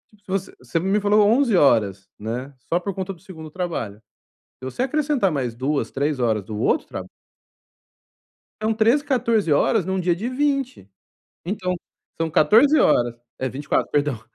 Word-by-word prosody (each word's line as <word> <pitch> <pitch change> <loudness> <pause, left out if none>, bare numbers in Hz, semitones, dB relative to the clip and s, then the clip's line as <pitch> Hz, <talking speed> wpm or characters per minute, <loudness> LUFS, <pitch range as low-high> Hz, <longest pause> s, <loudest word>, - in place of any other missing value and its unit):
Tipo, 195 -1 -2
se 190 - -14
voc - - -23
você 165 - -2
me 195 +4 +1
falou 205 0 +4
11 235 0 +3
horas, 105 - +3
né, 125 +6 -5 0.2
só 170 - +2
por 195 +2 -4
conta 190 0 -4
do 175 - -18
2º 160 -4 -11
trabalho. 155 - -4 0.6
Se 130 - -9
você 130 - -2
acrescentar 280 - +1
mais 125 -5 -2
2, 140 +4 -1
3 140 0 -1
horas 110 -4 +1
do 105 +1 -6
outro - - +1
traba - - -7 1.5
São 220 +1 +1
13, 230 +6 +3
14 230 - +1
horas 180 +6 +3
num 190 0 -1
dia 175 -1 +1
de 220 +8 -3
20. 270 - -1 0.6
Então, 180 -1 -2 0.5
são 165 - 0
14 230 - +5
horas 120 -1 +3 0.2
é, 130 0 -1
24, 140 +3 -1
perdão. 145 -6 0
180 Hz, 165 wpm, -22 LUFS, 135-220 Hz, 1.5 s, 14